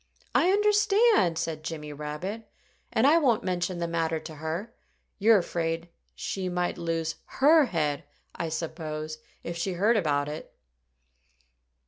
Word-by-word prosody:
"I 350 - +4
understand!" 420 - +4
said 155 -2 -3
Jimmy 150 -2 -5
Rabbit. 150 +10 -5 0.4
"And 220 - +3
I 310 +4 +6
won't 240 -7 +2
mention 180 0 -1
the 170 0 -1
matter 165 -1 0
to 155 0 -9
her. 165 +9 -4 0.5
You're 220 +2 +6
afraid 170 -2 -2 0.3
she 190 -2 -3
might 180 0 -1
lose 165 -1 -2 0.2
her 300 +2 +7
head, 150 - -1 0.3
I 165 - -3
suppose, 155 -1 -4 0.2
if 170 - -4
she 175 +3 -2
heard 210 +6 +3
about 145 -6 +1
it." 150 +1 -7
170 Hz, 135 wpm, -28 LUFS, 160-220 Hz, 0.5 s, her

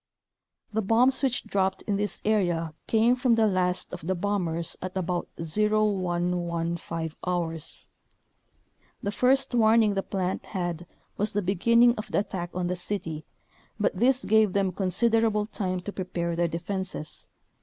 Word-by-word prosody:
The 220 - +1
bombs 240 +6 +3
which 260 -3 +1
dropped 190 -1 -1
in 205 - -1
this 205 +1 -2
area 175 -7 +1
came 230 +2 +4
from 250 -2 +3
the 225 -1 +3
last 185 -3 0
of 160 - -7
the 190 - +1
bombers 170 -4 -1
at 185 +1 -5
about 180 -1 -1
0115 175 -3 0 0.2
hours. 165 -3 -3 1.2
The 200 - -1
first 260 +5 +2
warn 225 -1 +5
ing 210 -2 +2
the 195 - 0
plant 190 -1 -3
had 175 -3 -3 0.3
was 210 +2 0
the 205 0 0
beginning 230 +6 +4
of 215 - -7
the - - +1
attack 175 -4 -5
on 180 -1 -1
the 180 +1 -1
city, 175 -4 -3 0.5
but - - +1
this 255 +2 +2
gave 220 -3 +4
them 195 -2 +1
consider 215 +5 +2
able 210 -2 +1
time 185 -4 -3
to 200 +3 -6
prepare 170 -2 -3
their 170 0 +1
defenses. 175 0 -4
190 Hz, 155 wpm, -27 LUFS, 175-215 Hz, 1.2 s, warn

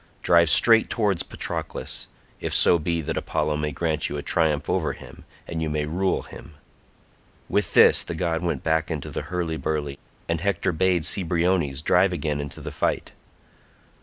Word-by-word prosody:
Drive 85 -2 +4
straight 115 +8 +6
towards 105 -7 0
Patroclus, - - -4 0.3
if - - -1
so 85 - +5
be 85 +1 -1
that 75 - -4
Apollo 75 -1 -1
may 75 0 -2
grant 80 +1 -1
you 75 - -4
a 70 - -5
triumph 80 -3 0
over - - 0
him, - - -14 0.2
and 80 -1 -4
you 80 - -1
may 75 0 -1
rule 90 +5 -1
him." 75 - -13 0.9
With - - -1
this - - +6
the 85 - -6
god 80 -1 -1
went 85 -6 -2
back 80 0 0
into 80 -4 -5
the - - -3
hurly 85 -3 -3
burly, 75 -3 -3 0.3
and 85 -1 -2
Hector 100 -1 0
bade 90 0 +1
Cebriones 85 -5 0
drive 90 +2 +3
again 75 -3 -2
into 70 -1 -8
the - - -6
fight. - - -2
80 Hz, 170 wpm, -24 LUFS, 75-90 Hz, 0.9 s, straight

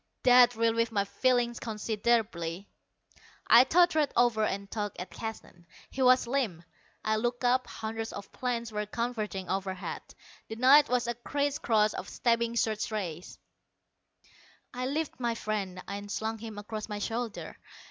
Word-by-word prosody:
That 245 -1 +7
relieved 230 0 +1
my 200 -2 +1
feelings 245 +2 +1
considerably. 210 -5 -1 0.8
I 235 +2 +8
tottered 315 0 +3
over 235 -2 +3
and 200 -1 -2
tugged 205 -2 -4
at 180 0 -6
Keston. 200 -6 -8 0.2
He 265 - -4
was 255 0 +5
limp. 235 -10 -1 0.4
I 215 0 +2
looked 240 +2 -2
up. 255 +1 +2
Hundreds 225 0 -5
of 200 - -9
planes 235 -2 -3
were 210 0 -3
converging 215 -4 -3
overhead; 190 0 -3 0.5
the 220 - -6
night 265 +5 +6
was 250 -1 +1
a 240 - -1
criss 285 +4 -2
cross 215 -2 +2
of - - -6
stabbing 235 -1 0
search 220 -2 0
rays. 180 -6 -5 1.4
I 250 +1 -3
lifted 300 +1 -3
my 235 -2 -1
friend 195 -5 -3
and 205 +1 -6
slung 220 +1 -3
him 220 -1 -8
across 215 +1 -6
my 210 - -3
shoulder. 225 +1 -4
225 Hz, 145 wpm, -29 LUFS, 205-245 Hz, 1.4 s, I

